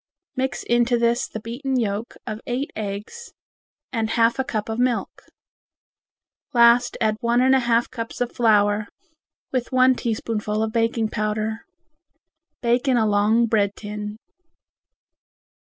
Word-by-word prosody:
Mix 265 0 -2
into 240 0 +2
this 235 +1 +1
the 220 - -7
beaten 255 +4 -2
yolks 215 0 -3
of 215 +1 -5
eight 255 +4 -2
eggs 215 - -6 0.6
and 225 -2 -1
half 230 +2 +2
a - - +2
cup 215 -4 -3
of 225 +1 -3
milk. 250 -2 -1 1.3
Last 235 +1 +5
add 215 -1 +1
one 235 0 +2
and 260 +1 +4
a 265 - +5
half 235 -1 +2
cups 230 -2 -6
of 245 -1 -1
flour 210 -2 +2 0.6
with 255 -1 -2
one 255 0 +5
teaspoonful 220 -2 -2
of 220 - -2
baking 230 -1 +1
powder. 215 +1 -2 1.0
Bake 240 +3 +1
in 255 -2 +3
a 220 - +3
long 210 +3 +3
bread 205 -3 +1
tin. 210 0 -6
230 Hz, 140 wpm, -23 LUFS, 215-245 Hz, 1.3 s, Last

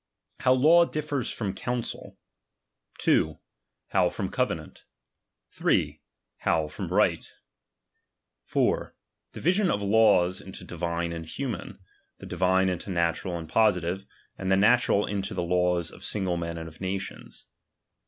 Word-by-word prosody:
How 130 0 +4
law 160 +7 +6
differs 150 -5 -3
from 100 -4 -3
counsel. 125 -1 -4 0.8
2. 80 -1 +2 0.5
How - - +3
from - - -4
covenant. - - -3 0.6
5. - - +1 0.5
How 80 -2 +1
from - - -6
righL - - +3 1.2
4. - - 0 0.4
Division 185 +3 +1
of 100 - 0
laws 100 -4 +4
into 95 -1 -10
divine 85 -1 -3
and 80 -1 -7
hu 135 +7 -3
man: 115 - -6 0.4
the - - -11
divine 95 +1 +2
into 90 +1 -3
natural 85 0 0
and 80 -1 -7
positive; 95 -1 +1 0.3
and 95 0 -1
the 95 - +5
natural 105 0 +4
into 95 -1 -3
the 90 - -1
lawe 90 0 +2
of 85 -1 -6
single 95 -4 -1
men 85 -1 -4
and 80 0 -6
of 80 +2 -14
nations. 95 0 -5
95 Hz, 135 wpm, -27 LUFS, 85-110 Hz, 1.2 s, law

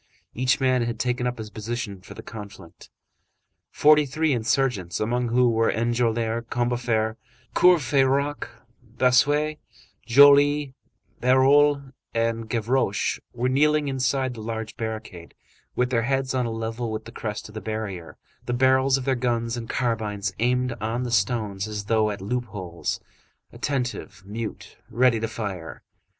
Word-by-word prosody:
Each 125 +1 +1
man 130 -2 +2
had 115 -1 -2
taken 125 +1 0
up 125 0 -3
his 110 -1 -7
position 110 -3 -5
for - - -12
the - - -9
conflict. 100 -5 -11 0.8
Forty 150 0 +4
three 155 +2 0
insurgents, 120 -6 0
among 120 +3 0
whom 120 0 +3
were 115 0 +2
Enjolras, 115 0 0
Combeferre, 120 -2 0 0.4
Courfeyrac, 140 -4 +3 0.5
Bossuet, 145 +5 +3 0.5
Joly, 145 +2 +6 0.5
Bahorel, 140 +2 +4 0.2
and 115 -1 -1
Gavroche, 115 -2 0 0.2
were 125 +1 0
kneeling 150 +3 +2
inside 130 0 0
the 115 - -9
large 110 0 -5
barricade, 110 -6 -6 0.4
with 125 0 0
their 115 -2 +2
heads 135 +2 -1
on 125 -2 0
a - - -3
level 115 +1 -3
with 110 0 -5
the 115 - -9
crest 105 -2 -5
of - - -14
the 110 - -6
barrier, 105 -6 -5 0.3
the 120 - -1
barrels 130 +1 +3
of 130 - -5
their 135 - +2
guns 120 -2 -1
and 115 -2 -6
carbines 105 -5 -1
aimed 125 +2 +1
on 115 +3 -2
the 125 - -4
stones 105 -2 0
as 105 -1 -4
though 110 0 +2
at 100 -2 -5
loop 125 +5 -2
holes, 90 -5 -5 0.5
attentive, 125 -7 -3
mute, 110 +2 -7
ready 120 -1 +3
to 115 - -2
fire. 95 - -6
120 Hz, 145 wpm, -24 LUFS, 110-130 Hz, 0.8 s, Joly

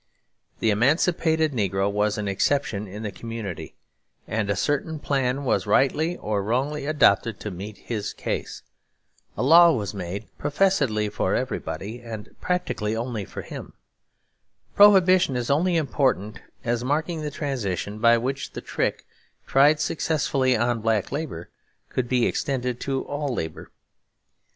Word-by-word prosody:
The 110 - +3
emancipated 160 - +2
negro 100 -4 0
was 105 0 0
an 105 -1 -2
exception 105 +1 0
in 105 +4 -8
the 105 - -3
community, 115 -6 -6 0.5
and 110 -2 -1
a 100 - +1
certain 145 - -1
plan 135 -2 -1
was, 130 - 0
rightly 160 +6 +2
or 105 -1 -1
wrongly, 135 +8 -1
adopted 115 -7 +3
to 105 - -4
meet 100 +4 -7
his 110 -4 -4
case. - - -4 0.7
A - - 0
law 170 +5 +8
was 105 - -2
made 100 +2 -5
professedly 145 - +1
for 105 - 0
everybody 110 +5 -4
and 110 -3 -8
practically 180 -12 -1
only 115 -3 -3
for - - -8
him. - - -9 1.0
Prohibition 185 -6 +6
is 125 +2 -1
only 170 +4 +2
important 130 - 0 0.2
as 120 0 -1
marking 155 +5 -1
the 150 - -3
transition 110 - -3
by 115 +1 +5
which 135 +3 -3
the - - -6
trick, - - -2 0.4
tried 145 +3 +4
successfully 140 -5 +1
on 120 0 0
black 110 -2 0
labour, 140 - -5 0.4
could 125 -2 -2
be 125 -2 +3
extended 125 -3 -1
to 135 -1 -2
all 145 -1 -3
labour. 80 -5 -5
125 Hz, 140 wpm, -24 LUFS, 105-145 Hz, 1.0 s, law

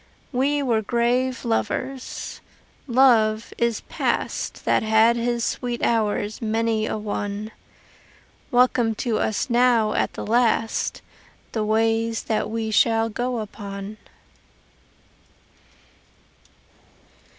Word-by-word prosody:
We 280 +3 +1
were 230 -4 +1
grave 245 +4 0
lovers. 255 +3 -3 0.5
Love 230 -4 +3
is 235 -1 +1
past - - -3
That - - +3
had 220 +2 +4
his 235 0 -1
sweet 245 -1 -3
hours 215 -2 0
many 225 0 0
a - - -2
one; 210 0 -4 1.0
Welcome 245 -3 +3
to 225 -1 -1
us 220 - 0
now 235 -3 +3
at - - 0
the - - -6
last 225 0 +1 0.5
The 220 - -1
ways 225 +1 +1
that 215 -1 -1
we 220 0 -2
shall 225 +1 +3
go 245 +3 -2
upon. 200 0 -7
225 Hz, 100 wpm, -23 LUFS, 215-245 Hz, 1.0 s, had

